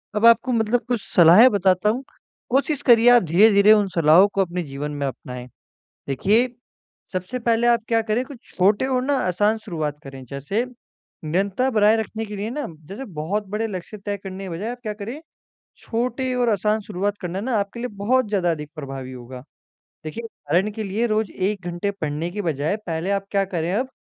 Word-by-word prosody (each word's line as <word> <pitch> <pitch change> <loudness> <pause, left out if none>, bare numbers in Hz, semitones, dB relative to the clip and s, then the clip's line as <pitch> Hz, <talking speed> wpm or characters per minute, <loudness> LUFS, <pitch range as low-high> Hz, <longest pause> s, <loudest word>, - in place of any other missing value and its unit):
अब 210 +2 +2
आपको 230 +2 +5
मतलब 230 0 +1
कुछ 245 -3 -1
सलाहें 180 +9 +8
बताता 190 0 +2
हूँ, 245 +5 -1 0.5
कोशिश 280 +3 +1
करिए 240 -2 +6
आप 245 -4 +6
धीरे-धीरे 200 +5 +5
उन 205 -2 +3
सलाहों 165 +4 +6
को 195 - +2
अपने 180 -1 -2
जीवन 145 0 -5
में 145 -1 -3
अपनाएँ। 125 -1 -7 0.6
देखिए 215 - +2 0.6
सबसे 185 +7 -3
पहले 235 0 +1
आप 235 -1 +4
क्या 230 -1 +3
करें 220 +3 -1
कुछ 275 -2 -11 0.2
छोटे 205 +7 +3
और 255 -1 0
ना 285 - +1
आसान 205 +5 +1
शुरुआत 155 -8 -4
करें। 135 -1 -9
जैसे 145 - -2 0.6
निरंतरता 195 +10 0
बनाए 215 -1 +4
रखने 220 0 -3
के 210 0 -7
लिए 210 +3 -3
ना 290 +4 -3 0.2
जैसे 210 +8 -7 0.2
बहुत 200 +6 -2
बड़े 215 +2 -1
लक्ष्य 195 +2 -7
तय 205 - -1
करने 190 0 -6
के 185 - -6
बजाय 195 +8 -4
आप 245 - -6
क्या 215 -2 -3
करें 225 +8 -7 0.6
छोटे 250 +2 -2
और 245 -2 +2
आसान 210 +1 +1
शुरुआत 205 0 -3
करना 180 +1 -3
ना 240 +1 -1
आपके 200 +3 -3
लिए 250 - -2
बहुत 250 +4 +2
ज़्यादा 185 -4 +1
अधिक 150 -2 -5
प्रभावी 135 -3 -7
होगा। 125 +1 -10 0.6
देखिए 230 +9 -5
कारण 180 +1 -1
के 220 0 -5
लिए 210 +4 -1
रोज़ 215 -1 0
1 195 0 -2
घंटे 175 +4 -2
पढ़ने 160 -3 -3
के 205 - -3
बजाय 160 0 -1
पहले 165 +4 -2
आप 195 0 -1
क्या 200 -1 +2
करें 170 +1 -1
अब 255 +5 0
205 Hz, 190 wpm, -22 LUFS, 175-230 Hz, 0.6 s, सलाहें